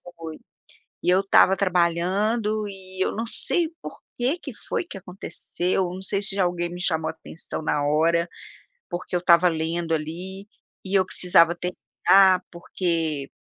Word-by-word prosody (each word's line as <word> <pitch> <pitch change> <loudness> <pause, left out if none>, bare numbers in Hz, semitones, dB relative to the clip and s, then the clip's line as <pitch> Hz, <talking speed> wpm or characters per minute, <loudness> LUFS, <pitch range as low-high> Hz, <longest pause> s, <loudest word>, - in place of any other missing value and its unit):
foi, 160 -1 -8 0.7
eu 185 +2 +4
estava 195 -1 +5
trabalhando 200 +5 +1
e 190 -1 -5
eu - - 0
não 225 +2 -3
sei 335 +7 0
por - - -8 0.2
que 260 +8 0
que - - -9
foi - - -1
que 220 - -9
aconteceu, 185 0 -3
não 185 - -7
sei 195 +1 -1
se 195 -1 +3
já 195 - +3
alguém 175 -1 -1
me 175 - -7
chamou 160 -3 0
atenção 160 0 -7
na 150 -1 0
hora, 165 +3 +2 0.6
porque 180 0 -3
eu - - 0
estava 175 0 +5
lendo 165 +1 -1
ali 180 +6 -5 0.4
e 190 - -4
eu 190 -1 +5
precisava 170 -2 +3
terminar, 185 +1 +3
porque 165 -5 -2
180 Hz, 150 wpm, -24 LUFS, 170-195 Hz, 0.7 s, estava